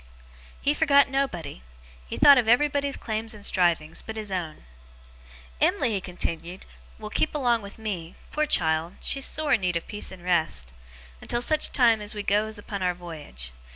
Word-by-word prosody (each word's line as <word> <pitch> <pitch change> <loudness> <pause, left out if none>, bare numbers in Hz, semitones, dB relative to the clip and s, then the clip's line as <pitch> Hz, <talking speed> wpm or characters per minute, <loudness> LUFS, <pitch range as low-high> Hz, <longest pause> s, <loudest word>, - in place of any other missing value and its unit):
He 285 - +2
forgot 280 -3 +4
nobody. 240 - -2 0.5
He - - -5
thought 280 -2 +8
of 235 - 0
everybody's 280 +3 +2
claims 220 0 -4
and 205 -1 -9
strivings, 170 -4 +1
but 220 - -8
his 215 -2 -5
own. 165 - -4 1.0
'Em'ly,' - - +2
he 200 -3 -1
continued, 175 0 -5 0.3
'will 215 -1 -8
keep 310 - 0
along 240 -5 +2
with 200 0 -10
me 190 -7 -5 0.2
poor 305 0 0
child, 160 - +2
she's 275 -1 0
sore 310 -1 0
in 225 - +3
need 180 -2 0
of 170 - -6
peace 210 - -4
and 185 -2 -11
rest! 160 - +1 0.5
until 240 - -1
such 310 +3 +2
time 230 -5 +4
as 210 +1 -3
we 205 - -4
goes 215 +2 0
upon 205 -1 -6
our 180 -1 0
voyage. 150 - -6
205 Hz, 175 wpm, -26 LUFS, 175-245 Hz, 1.0 s, thought